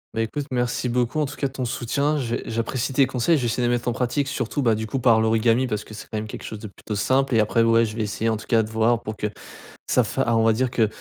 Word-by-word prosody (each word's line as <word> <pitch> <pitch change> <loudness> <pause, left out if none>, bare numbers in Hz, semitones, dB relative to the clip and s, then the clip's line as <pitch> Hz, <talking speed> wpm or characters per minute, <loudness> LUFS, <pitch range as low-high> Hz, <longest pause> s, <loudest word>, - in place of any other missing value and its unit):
Bah 115 - +1
écoute, 140 +5 -4
merci 125 0 -1
beaucoup 125 +4 0
en 150 - +1
tout 150 - -8
cas 140 - -1
de 130 - -12
ton 130 -2 -3
soutien. 140 +5 0
J'ai 120 -4 -2
j'apprécie 115 +3 -2
tes 135 +1 +5
conseils, 135 +6 +1
je 130 - -2
vais - - 0
essayer 115 +1 0
de - - +2
les 120 - +3
mettre 120 - -8
en - - 0
pratique, 130 +4 -1
surtout 140 0 -2
bah 115 -2 +4
du 110 0 -3
coup 135 - -2
par 115 -3 +4
l'origami, 115 +3 +2
parce 105 -3 -2
que - - -13
c'est 105 - -9
quand 110 - -4
même 105 - -3
quelque - - -8
chose 110 - -6
de 105 - -10
plutôt 105 +1 -7
simple, 130 +5 +1
et - - +5
après 110 +2 +2
ouais, 115 0 +4
je 110 -1 -6
vais 115 - -2
essayer, 105 +1 -2
en 110 - +2
tout 105 - -9
cas, 115 -1 +3
de 110 - -7
voir 115 +1 +2
pour 110 -1 -5
que 105 - -2 0.6
ça - - +2
fa - - -1
ah 115 -1 +2
on 115 - +3
va 115 - +5
dire 125 +2 0
que 115 -4 +2
115 Hz, 315 wpm, -23 LUFS, 110-130 Hz, 0.6 s, tes